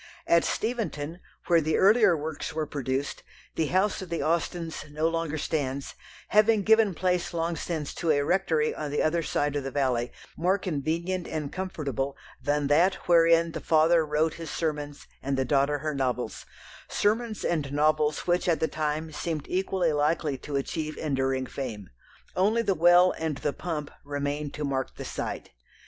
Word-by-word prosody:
At 170 0 +4
Steventon, 190 -9 -2 0.3
where 170 -2 +4
the 155 +1 +1
earlier 205 -3 +5
works 155 +1 -5
were 155 -1 -1
produced, 140 -1 -3 0.3
the 160 - 0
house 190 +5 +1
of 185 - -7
the 170 - -2
Austens 165 0 -1
no 155 +2 0
longer 165 -2 -1
stands, 140 -3 -2 0.4
having 215 0 +4
given 220 -3 +4
place 180 0 0
long 165 0 0
since 160 -4 -4
to 170 - -3
a 145 -2 +3
rectory 165 -4 +1
on 150 -1 -4
the 145 - 0
other 165 +2 +2
side 145 -2 -1
of 145 - -1
the 135 - -3
valley, 130 -3 0 0.2
more 180 +4 +2
convenient 170 +1 -2
and 150 -3 -4
comfortable 140 - -3 0.2
than 145 +2 0
that 170 +7 +4
wherein 165 -1 +5
the - - -5
father 160 +1 +4
wrote 155 +1 +1
his 165 -2 -7
sermons 145 -3 -3 0.2
and 135 0 -1
the 130 - +1
daughter 140 +2 +2
her 155 +1 -3
novels 125 -5 -2 0.4
sermons 220 +1 0
and 150 -5 -1
novels 150 +1 +2
which 175 0 +1
at 165 - +2
the 160 - +1
time 155 +1 -2
seemed 155 -1 -3
equally 185 -3 0
likely 150 0 +1
to 140 +2 -6
achieve 155 +3 -2
enduring 135 -3 0
fame. 115 -8 -6 0.4
Only 215 +5 +2
the 200 -3 +2
well 175 +2 +6
and 160 -3 -2
the 145 - -2
pump 155 -4 -4
remain 145 +1 -3
to 150 - -4
mark 135 -1 -2
the - - -7
site. - - -5
155 Hz, 170 wpm, -27 LUFS, 145-175 Hz, 0.4 s, well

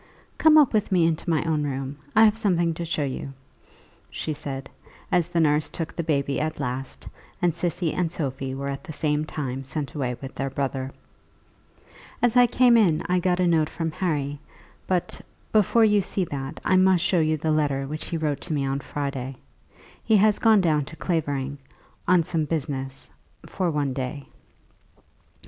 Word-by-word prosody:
"Come 315 -1 +7
up 295 -6 +5
with 210 -2 +1
me 175 -3 +4
into 165 +1 -1
my 160 -2 +2
own 160 -2 0
room; 135 -1 -3 0.2
I 220 +1 +8
have 210 0 +4
something 175 -7 +1
to 170 +1 -5
show 160 -2 -1
you," 135 0 -4 0.8
she 155 - -4
said, 135 -2 -6 0.4
as 175 -2 +2
the 175 -1 -1
nurse 150 -1 +2
took 165 -2 -5
the - - -1
baby 140 -3 0
at 155 0 -2
last; 125 - -5 0.3
and 175 -2 +2
Cissy 170 0 -1
and 175 -3 -1
Sophie 135 -4 -3
were 140 +1 -4
at 140 0 -4
the 170 -4 -8
same 150 0 0
time 135 -4 -4
sent 140 +2 -4
away 125 -5 -2
with 135 -1 -8
their 135 0 -3
brother. 135 -1 -2 1.3
"As 245 -1 +2
I 245 0 +7
came 245 0 +5
in 175 -8 +3
I 180 0 +3
got 180 0 +1
a 180 - +3
note 160 -3 +2
from 165 -1 -3
Harry, 145 -5 -2 0.5
but, 180 -1 -1 0.3
before 220 +2 +4
you 210 -1 +4
see 190 0 -1
that, 135 -3 -5
I 185 - +4
must 185 -2 +4
show 190 -2 +3
you 155 0 +2
the 155 +1 -1
letter 145 -3 +1
which 155 +3 -5
he 170 - -2
wrote 150 -3 -1
to 170 - -4
me 140 -2 0
on 135 +1 -1
Friday. 140 -2 -4 0.7
He 220 -2 +4
has 210 +1 +4
gone 220 -3 +5
down 155 -5 +2
to 160 - -10
Clavering, 145 -5 -2 0.5
on 180 -1 +5
some 160 -1 -1
business, 135 -4 -4 0.4
for 185 -2 -1
one 145 -4 -1
day." 135 +2 -4
155 Hz, 185 wpm, -25 LUFS, 140-180 Hz, 1.3 s, I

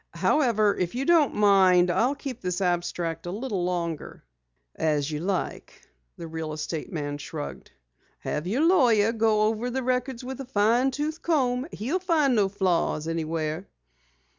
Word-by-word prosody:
"However, 215 -8 +2
if 180 +4 -2
you 265 +2 -1
don't 330 -4 +4
mind, 190 -3 +5
I'll 250 +10 +1
keep 270 -4 -7
this 180 -1 -2
abstract 175 -2 -2
a - - -3
little 205 -3 -3
longer." 170 -3 -4 0.5
"As 150 -1 0
you 150 - -3
like," 185 +2 -3 0.4
the 170 - -7
real 160 -1 -5
estate 155 +1 -5
man 145 -2 -4
shrugged. 150 0 -7 0.5
"Have 150 +3 -3
your 255 - +1
lawyer 235 - +4
go 220 -2 +2
over 220 +3 0
the 260 +1 -2
records 250 0 -1
with 265 +1 -6
a - - -7
fine 235 +3 +2
tooth 300 +4 -3
comb. 260 -5 +1
He'll 270 - -2
find 320 -7 +2
no 205 -4 +2
flaws 180 -5 0
anywhere." 160 +1 -3
205 Hz, 155 wpm, -26 LUFS, 170-255 Hz, 0.5 s, mind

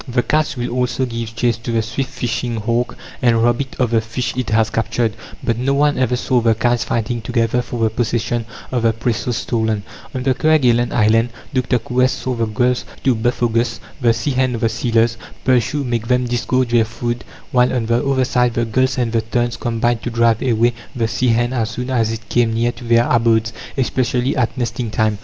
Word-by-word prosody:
The 125 -1 0
kites 155 -2 0
will 120 0 -2
also 125 +1 0
give 115 -2 -5
chase 120 -1 +1
to 115 +1 -5
the 115 -1 +1
swift 125 +4 -3
fishing 120 0 -2
hawk, 115 +3 -1 0.2
and 115 -2 +3
rob 120 +2 +2
it 135 -1 -6
of 125 -3 +1
the 115 -1 +3
fish 115 +1 -3
it 125 -4 -2
has 110 0 +2
captured; 115 0 0 0.3
but 115 0 0
no 135 +2 +1
one 145 -1 +2
ever 125 -1 +2
saw 125 0 +1
the 115 -1 +3
kites 120 0 +1
fighting 115 +1 -2
together 115 +2 0
for 120 -1 -4
the 110 - +2
possession 120 0 -1 0.3
of 125 -2 0
the 115 0 +3
prey 115 +2 -1
so 110 +2 -4
stolen. 110 -3 -1 0.3
On 130 - -2
the 135 0 +3
Kerguelen 125 -5 +3
Island, 115 +1 +3 0.2
Dr. 125 -1 +1
Coues 125 +2 +1
saw 130 - -3
the 115 -2 -1
gulls 125 +3 +1 0.2
to 130 - +4
Buphogus 115 0 0 0.2
the 120 -2 +4
sea 115 +5 -1
hen 130 -1 +1
of 115 - -5
the 115 - +2
sealers 115 0 +1 0.3
pursue 130 +3 +2
make 120 -3 -2
them 125 0 +2
disgorge 125 +1 0
their 120 -1 +4
food, 120 +2 -4 0.3
while, 125 0 +3
on 125 -3 -1
the 115 +3 +1
other 135 -2 +2
side, 125 -1 +1
the 120 - +1
gulls 130 +4 +1
and 120 -2 0
the 115 -1 +1
terns 120 +2 -1
combined 120 0 0
to - - -3
drive 115 -1 +2
away 120 -1 +2 0.2
the 115 -2 0
sea 125 +3 0
hen 120 +1 +2
as 115 -3 0
soon 125 +4 -4
as 115 -3 +1
it 115 -2 -6
came 115 -1 +1
near 120 +1 +1
to 125 - -13
their 115 0 +3
abodes, 115 -1 +2 0.2
especially 130 0 0
at 120 -4 0
nesting 120 -1 -2
time. 110 -1 0
120 Hz, 215 wpm, -19 LUFS, 115-125 Hz, 0.3 s, to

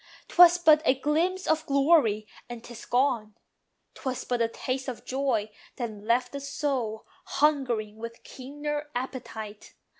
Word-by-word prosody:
'Twas 350 0 +8
but 315 -3 +6
a 265 - +4
glimpse 340 +7 0
of 315 0 +1
glory, 275 -7 +3 0.2
and 240 -1 -8
'tis 240 -1 -10
gone. 240 -4 0 0.6
'Twas 260 -1 -4
but 245 -1 -1
a 230 - +3
taste 260 +3 -4
of 250 -3 -6
joy 255 -5 0 0.3
that 240 -4 -3
left 235 +4 0
the 280 - -5
soul 275 -6 -2 0.2
Hungering 245 -8 +1
with 230 +1 -8
keener 295 +3 -5
appetite. 225 -5 -6
260 Hz, 140 wpm, -27 LUFS, 230-295 Hz, 0.6 s, Twas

